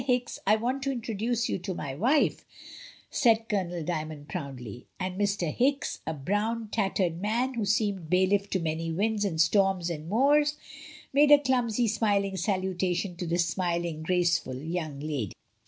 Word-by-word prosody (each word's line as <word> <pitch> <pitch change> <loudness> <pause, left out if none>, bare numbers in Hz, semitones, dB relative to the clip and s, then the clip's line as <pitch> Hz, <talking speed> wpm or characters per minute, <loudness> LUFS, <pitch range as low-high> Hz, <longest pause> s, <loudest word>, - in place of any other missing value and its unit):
Hicks, 250 -1 0
I 210 - +6
want 250 +5 -1
to 275 0 -1
introduce 230 -1 -1
you - - -2
to 180 +1 -4
my 140 -5 -4
wife," 250 - +2 0.7
said 225 -2 +3
Colonel 180 -5 -2
Dymond, 155 -3 -4
proudly; 125 -5 -6
and 185 0 -2
Mr. 200 -5 0
Hicks, 275 +3 0
a 160 - -1
brown, 210 +9 -1
tattered 190 -5 0
man, 235 +6 0
who 230 -4 -1
seemed 200 -5 0
bailiff 190 +3 +2
to 190 - 0
many 165 0 -2
winds 210 +5 0
and 165 -5 -2
storms 190 0 +3
and 155 0 -6
moors, 290 +6 +3 0.6
made 290 +2 +5
a 295 - +10
clumsy, 245 -4 +1
smil 205 -2 +2
ing 195 -1 -4
salutation 185 -1 -1
to 175 - -4
the 170 +1 0
smiling, 170 -2 -1
graceful 175 -5 +1
young 155 -1 -4
lady. 145 -10 -3
195 Hz, 160 wpm, -28 LUFS, 170-225 Hz, 0.7 s, a